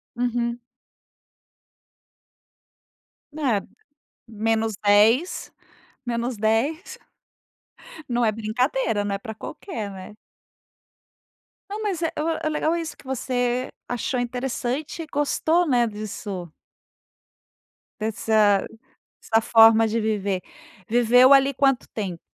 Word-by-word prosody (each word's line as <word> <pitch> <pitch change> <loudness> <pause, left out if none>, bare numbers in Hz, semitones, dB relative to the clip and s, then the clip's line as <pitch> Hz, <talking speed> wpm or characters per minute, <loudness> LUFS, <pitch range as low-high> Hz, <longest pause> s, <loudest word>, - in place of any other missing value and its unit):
Uhum. 240 0 -1 2.7
Né? 270 -9 0 0.7
-10, 220 - +2 0.5
-10. 235 - -1 1.1
Não 240 0 +1
é 215 - +3
brincadeira, 225 0 -1
né 200 -1 -2
pra 220 +1 -8
qualquer, 220 - -6
né? 195 +2 -10 1.5
Não, 420 +2 -5
mas 385 -5 -2
é 330 - 0 0.3
é 310 - +1
legal 310 +2 0
isso 330 -1 -4
que - - -19
você 250 -1 -1 0.2
achou 245 +1 -2
interessante 250 +5 -3
e - - -12
gostou, 315 +4 +1
né, 245 -3 +3
disso. 205 -4 -6 1.5
Dessa 215 -2 +2 0.6
dessa 225 - +2
forma 225 0 +6
de 225 +1 -1
viver. 200 -4 -1 0.5
Viveu 245 +3 +5
ali 275 0 +5
quanto 270 -1 +1
tempo? 190 -6 -4
235 Hz, 90 wpm, -24 LUFS, 215-265 Hz, 2.7 s, forma